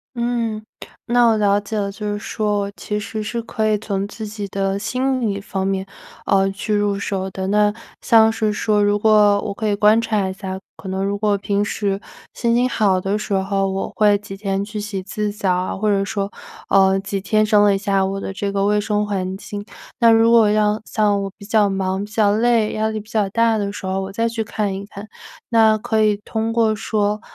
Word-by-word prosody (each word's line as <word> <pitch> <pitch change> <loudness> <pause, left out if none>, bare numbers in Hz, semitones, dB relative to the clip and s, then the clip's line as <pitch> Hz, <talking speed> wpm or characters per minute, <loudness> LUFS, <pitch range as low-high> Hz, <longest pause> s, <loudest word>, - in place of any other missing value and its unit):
嗯， 235 -2 -2 0.4
那 240 0 +3
我 225 -1 +3
了 205 -1 +3
解 205 +2 -5
了， 200 -1 -1
就 210 +1 -4
是 205 - -2
说 210 -1 -1
我 200 - -4
其 210 -1 -3
实 220 +1 -5
是 225 +3 -3
可 220 -1 -1
以 215 - +2
从 200 -2 -3
自 220 +2 -7
己 210 -1 -6
的 195 0 -1
心 255 +4 -1
理 205 -4 -1
方 195 -2 -4
面， 195 0 -1 0.4
呃， 195 0 +3
去 205 +2 -3
入 205 -1 +1
手 190 -1 -3
的。 190 0 -5
那 210 +1 +3 0.3
像 225 -1 +5
是 220 -1 0
说 210 0 +1
如 205 0 +2
果 210 -1 +4
我 200 - -4
可 215 +1 -3
以 205 - +1
观 210 +2 +4
察 215 -4 0
一 190 - -4
下， 190 -1 -6 0.2
可 190 - -11
能 190 +1 -2
如 200 0 -1
果 205 -1 +1
平 200 +1 0
时 200 -2 -2 0.3
心 235 -1 0
情 250 +1 +3
好 200 -6 +2
的 195 +3 -1
时 210 - -4
候， 195 0 0
我 190 0 -3
会 205 -1 +4
几 200 -1 -9
天 195 -1 -2
去 210 0 -6
洗 205 -2 -4
一 - - -7
次 210 +1 -3
澡 200 -3 0
啊， 180 +1 -2
或 215 +2 -2
者 195 -1 +2
说， 200 0 -3 0.4
呃， 195 0 +4
几 200 0 -4
天 215 +3 +2
整 210 -1 +4
理 200 - +3
一 - - 0
下 195 -1 +1
我 195 +1 -3
的 195 - -5
这 200 0 -3
个 200 0 0
卫 210 +1 +2
生 210 -1 0
环 190 -2 -3
境。 205 0 -7 0.4
那 230 -1 +6
如 225 +1 +5
果 225 -3 +6
要 210 0 +2
像 205 -2 +1
我 195 - -3
比 200 - -12
较 210 -1 +3
忙、 190 0 -1
比 210 - -10
较 210 -3 +3
累、 225 0 +2
压 220 0 0
力 220 0 -3
比 210 - -13
较 215 -3 +1
大 230 +1 +2
的 200 -1 -2
时 200 - -8
候， 190 +1 -1
我 190 0 -5
再 230 +3 0
去 225 -1 -3
看 210 -2 -2
一 195 - -5
看， 205 +1 -10 0.4
那 220 -2 +4
可 220 0 +1
以 210 -1 +2
通 225 0 -2
过 225 -2 +2
说 210 -1 -1
205 Hz, 250 characters per minute, -20 LUFS, 195-220 Hz, 0.4 s, 那